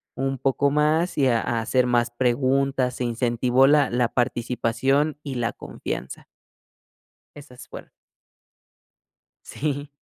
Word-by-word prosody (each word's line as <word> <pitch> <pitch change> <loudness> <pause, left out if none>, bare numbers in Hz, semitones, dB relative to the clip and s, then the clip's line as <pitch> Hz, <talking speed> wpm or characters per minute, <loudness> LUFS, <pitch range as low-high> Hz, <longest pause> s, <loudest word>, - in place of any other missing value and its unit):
un 135 +1 -2
poco 135 +2 +1
más 155 +4 +1
y 140 -2 +3
a 115 -3 +2
a 115 - -2
hacer 125 +3 +1
más 120 -1 +1
preguntas, 130 +1 0
se 125 - -4
incentivó 120 +2 +2
la 145 -2 +4
la 120 0 +1
participación 125 +4 0
y 140 -3 -6
la 120 -2 -1
confianza. 65 - -7 1.1
Esas 130 -4 -13
fueron. - - -11 1.6
Sí. 145 0 -4
130 Hz, 120 wpm, -23 LUFS, 120-140 Hz, 1.6 s, la